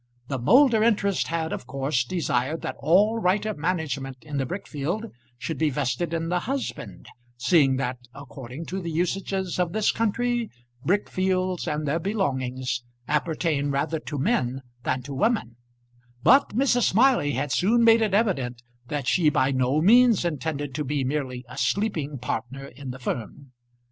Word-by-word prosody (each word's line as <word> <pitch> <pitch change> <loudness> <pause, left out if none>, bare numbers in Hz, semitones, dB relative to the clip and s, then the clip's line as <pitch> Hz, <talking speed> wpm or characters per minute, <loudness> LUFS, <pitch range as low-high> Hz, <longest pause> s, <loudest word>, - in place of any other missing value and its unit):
The 135 -2 -2
Moulder 235 - +5
interest 205 -4 +2
had 165 -1 -2
of 120 - -6
course 135 0 0
desired 150 -2 -1
that - - -3
all 205 +7 +3
right 195 +1 +1
of 215 -1 -2
management 145 -6 -2
in 150 -2 -5
the 135 -2 -1
brick 195 +7 -5
field 165 +10 -3 0.3
should 160 +5 -4
be 155 -1 +3
vested 140 +4 -1
in 165 0 -2
the 180 0 +1
husband, 225 - -5 0.3
seeing 135 -1 +4
that, 130 -1 -2 0.2
according 135 +2 -8
to 190 +3 -4
the 170 - -4
usages 180 +2 -2
of 175 -1 0
this 215 -1 +2
country, 235 +1 0 0.3
brick 200 +4 +1
fields 185 -1 -1
and 150 -1 -2
their 150 +4 +1
belongings 130 - -2 0.3
appertain 150 -1 0
rather 145 +3 -1
to 150 -1 -6
men 135 - 0 0.2
than 130 +1 -1
to 140 +2 -7
women; 135 - 0 0.7
but 270 +3 +6
Mrs. 250 -2 +3
Smiley 230 - +3
had 135 +3 -2
soon 225 - +3
made 230 0 +6
it 210 -3 +2
evident 135 - 0 0.2
that 145 -1 -3
she 155 +5 +3
by 135 -2 +2
no 130 +3 +1
means 235 -1 +5
intended 145 -3 -3
to 150 - -2
be 145 0 -1
merely 130 -2 -3
a 125 +2 -8
sleeping 150 - -1
partner 130 +2 -4
in 140 -1 -9
the 125 - -6
firm. 125 +2 -5
155 Hz, 165 wpm, -25 LUFS, 135-195 Hz, 0.7 s, but